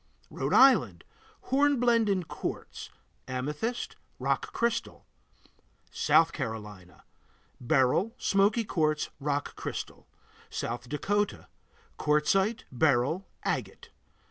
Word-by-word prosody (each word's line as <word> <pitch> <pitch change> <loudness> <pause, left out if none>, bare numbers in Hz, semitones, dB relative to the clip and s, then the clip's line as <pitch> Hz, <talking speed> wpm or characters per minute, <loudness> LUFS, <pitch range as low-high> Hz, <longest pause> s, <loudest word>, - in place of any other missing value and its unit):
Rhode - - -1
Island 265 0 +5 0.5
Hornblende 245 -5 +3
in 190 -2 +1
quartz, - - -6 0.4
amethyst, 150 - -3 0.2
rock - - -1
crystal. 235 0 -2 0.9
South 455 - +3
Carolina 105 - -7 0.6
Beryl, 135 - +2
smoky 205 +4 +2
quartz, 155 -6 0
rock 145 0 -2
crystal. - - -6 0.4
South 120 +1 -4
Dakota 205 +8 -1 0.5
Quartzite, 190 +9 +2
beryl, 140 +6 +1 0.2
agate. - - -3
160 Hz, 85 wpm, -29 LUFS, -, 0.9 s, Island